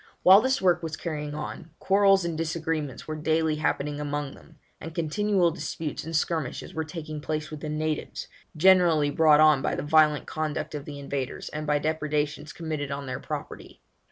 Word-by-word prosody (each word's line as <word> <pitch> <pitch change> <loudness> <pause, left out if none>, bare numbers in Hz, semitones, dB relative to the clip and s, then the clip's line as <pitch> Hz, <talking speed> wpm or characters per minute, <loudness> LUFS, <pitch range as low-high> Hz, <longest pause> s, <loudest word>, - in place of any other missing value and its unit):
While 190 +3 +9
this 260 +2 +1
work 175 -2 +3
was 160 -1 -5
carrying 150 -3 -4
on, 155 +2 -6
quarrels 195 -1 +4
and 170 -1 -2
disagreements 160 -3 -3
were 155 - -3
daily 160 0 +1
happening 145 0 -1
among 145 -1 -3
them, 160 - -17 0.2
and 160 0 -8
continual 180 +2 +1
disputes 160 -2 -5
and 165 +1 -5
skirmishes 160 +1 -2
were 160 -2 -2
taking 155 -2 -7
place 155 0 -3
with 155 - -6
the 155 - -5
natives, 155 0 -3 0.3
generally 170 -4 +5
brought 155 -1 +5
on 155 -3 +6
by - - -1
the - - -3
violent 150 -1 +4
conduct 155 -1 -3
of 145 -1 -5
the 145 -1 -7
invaders, 140 -2 -4
and 150 0 -5
by 150 0 +3
depredations 150 -1 -2
committed 155 -4 -4
on 140 0 -4
their 130 -1 -4
property. - - -7
155 Hz, 180 wpm, -26 LUFS, 150-165 Hz, 0.3 s, While